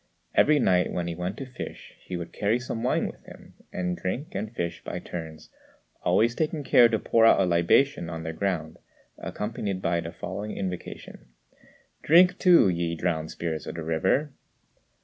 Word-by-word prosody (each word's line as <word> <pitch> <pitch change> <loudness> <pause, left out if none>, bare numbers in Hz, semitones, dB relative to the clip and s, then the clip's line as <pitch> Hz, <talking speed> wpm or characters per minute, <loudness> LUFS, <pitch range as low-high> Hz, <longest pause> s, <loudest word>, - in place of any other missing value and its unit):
Every 155 0 +5
night 90 -9 +2
when 90 - -2
he 85 - -3
went 90 +4 -4
to 135 - -5
fish 125 -1 -9
he 90 - -5
would 85 -1 -7
carry 105 +3 +1
some 120 -2 -5
wine 125 - +1
with - - -8
him, - - -14 0.2
and 90 -1 -2
drink 120 - -4
and 105 +2 -4
fish 85 -7 -4
by - - -5
turns, 80 -2 -8 0.5
always 110 +7 +3
taking 155 +1 -2
care 120 -3 +6
to 110 - +1
pour 115 +2 +2
out 115 - +6
a 95 - +4
libation 85 +4 +2
on 80 -1 -5
the 80 0 -4
ground, 80 -3 -3 0.4
accompanied 105 -3 -4
by 85 -2 0
the 85 0 -6
following 105 +4 -6
invocation: 90 -8 -6 0.7
"Drink 180 +4 +5
too, 175 - +6
ye 85 -2 -1
drowned 80 -2 -2
spirits 80 -3 -4
of - - -5
the 85 - -5
river!" 95 - 0
95 Hz, 175 wpm, -26 LUFS, 85-120 Hz, 0.7 s, care